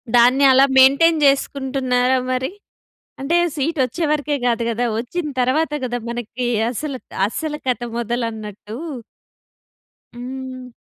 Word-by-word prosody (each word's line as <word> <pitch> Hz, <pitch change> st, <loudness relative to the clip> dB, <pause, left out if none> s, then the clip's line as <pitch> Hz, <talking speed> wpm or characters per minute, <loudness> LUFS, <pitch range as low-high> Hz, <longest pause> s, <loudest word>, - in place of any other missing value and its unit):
దాన్ని 250 Hz, +3 st, +5 dB
అలా 265 Hz, +1 st, +6 dB
మెయింటైన్ 280 Hz, +5 st, +6 dB
జేసుకుంటున్నారా 265 Hz, -2 st, +1 dB
మరి? 255 Hz, +1 st, -1 dB, 0.7 s
అంటే, 290 Hz, +6 st, +1 dB, 0.2 s
సీటొచ్చే 295 Hz, 0 st, -1 dB
వరకే 295 Hz, -1 st, 0 dB
గాదు 235 Hz, -1 st, +1 dB
గదా! 235 Hz, +1 st, -1 dB
వొచ్చిన 300 Hz, +8 st, -3 dB
తరువాత 295 Hz, +6 st, +1 dB
కదా! 245 Hz, -1 st, -2 dB
మనకి 240 Hz, +1 st, -4 dB, 0.2 s
అసలు, 275 Hz, +2 st, -4 dB, 0.3 s
అసలు 300 Hz, +7 st, -4 dB
కథ 250 Hz, -2 st, 0 dB, 0.2 s
మొదలన్నట్టు. 220 Hz, -3 st, -4 dB, 1.4 s
హ్మ్. 255 Hz, 0 st, -7 dB
255 Hz, 105 wpm, -20 LUFS, 240-280 Hz, 1.4 s, అలా